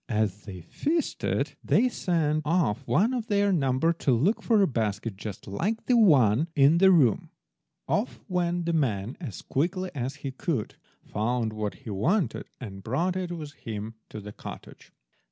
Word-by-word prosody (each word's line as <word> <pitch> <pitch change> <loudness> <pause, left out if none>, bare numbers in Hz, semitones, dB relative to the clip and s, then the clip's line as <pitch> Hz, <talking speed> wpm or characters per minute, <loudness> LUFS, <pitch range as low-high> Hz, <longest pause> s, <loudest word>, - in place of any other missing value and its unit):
As 105 -3 -1
they 95 -4 -8
feasted 310 - -1
they 255 - +3
sent 160 -9 0
off 145 -7 0
one 225 +7 +3
of 235 -3 -2
their 205 -2 +2
number 135 +1 +2
to 155 -4 0
look 150 - +2
for 220 -4 +3
a - - +4
basket 110 -4 -2
just 100 0 -7
like 205 - -2
the 250 - +3
one 145 - +5
in 145 +3 +5
the 190 +1 +7
room. 145 - +4 0.6
Off - - -1
went 175 -1 0
the 170 - 0
man 115 -8 0
as 115 - -7
quickly 180 +6 -1
as 135 0 -3
he 135 - -2
could, 130 -3 -2 0.3
found 115 +1 -1
what 105 -1 -3
he 110 - -4
wanted, 165 - 0
and 95 -6 -8
brought 165 - -1
it 185 -2 -3
with 155 -4 -6
him 110 -4 -6 0.2
to 110 - -7
the 105 0 -8
cottage. - - -10
145 Hz, 170 wpm, -27 LUFS, 110-180 Hz, 0.6 s, the